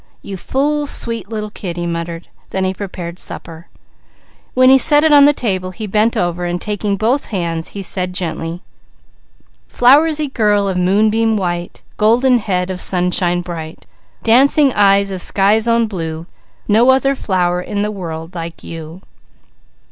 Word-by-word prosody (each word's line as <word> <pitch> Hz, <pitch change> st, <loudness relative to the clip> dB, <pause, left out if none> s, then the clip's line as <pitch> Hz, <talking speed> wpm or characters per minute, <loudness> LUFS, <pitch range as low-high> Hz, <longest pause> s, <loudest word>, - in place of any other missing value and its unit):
"You 195 Hz, -, -6 dB
fool 290 Hz, +8 st, -1 dB
sweet 230 Hz, -7 st, -3 dB
little 215 Hz, -2 st, -5 dB
kid," 180 Hz, -5 st, -6 dB
he 175 Hz, -, -3 dB
muttered. 170 Hz, 0 st, -5 dB, 0.2 s
Then 190 Hz, -, -2 dB
he 185 Hz, 0 st, 0 dB
prepared 180 Hz, -3 st, -7 dB
supper. 165 Hz, +1 st, -9 dB, 0.9 s
When 255 Hz, 0 st, +6 dB
he 270 Hz, -, +6 dB
set 295 Hz, +1 st, +5 dB
it 315 Hz, -, +4 dB
on 285 Hz, -1 st, +7 dB
the 290 Hz, -, +6 dB
table 190 Hz, -9 st, -2 dB
he 185 Hz, +4 st, -7 dB
bent 215 Hz, +3 st, +1 dB
over 175 Hz, 0 st, -1 dB
and 175 Hz, 0 st, -2 dB
taking 205 Hz, 0 st, -2 dB
both 240 Hz, +7 st, 0 dB
hands 170 Hz, -5 st, -3 dB
he 200 Hz, -, -4 dB
said 180 Hz, 0 st, -2 dB
gently: 170 Hz, -1 st, -4 dB, 1.1 s
"_Flowersy 295 Hz, +3 st, +3 dB
girl 205 Hz, -2 st, +2 dB
of 190 Hz, -, -2 dB
moonbeam 215 Hz, +4 st, +2 dB
white, 175 Hz, -2 st, -4 dB
Golden 240 Hz, +4 st, +3 dB
head 190 Hz, -4 st, -2 dB
of 185 Hz, -, -5 dB
sunshine 180 Hz, -1 st, 0 dB
bright, 165 Hz, -2 st, -8 dB, 0.4 s
Dancing 270 Hz, +4 st, +4 dB
eyes 200 Hz, -1 st, +3 dB
of 185 Hz, -2 st, -4 dB
sky's 210 Hz, +5 st, +2 dB
own 230 Hz, 0 st, +3 dB
blue, 165 Hz, -6 st, -5 dB, 0.4 s
No 225 Hz, +4 st, +4 dB
other 270 Hz, +1 st, +3 dB
flower 180 Hz, -7 st, -1 dB
in 205 Hz, +2 st, -3 dB
the 210 Hz, -, -2 dB
world 165 Hz, -4 st, -7 dB
like 165 Hz, -1 st, -7 dB
you. 165 Hz, +3 st, -9 dB
195 Hz, 155 wpm, -16 LUFS, 175-230 Hz, 1.1 s, on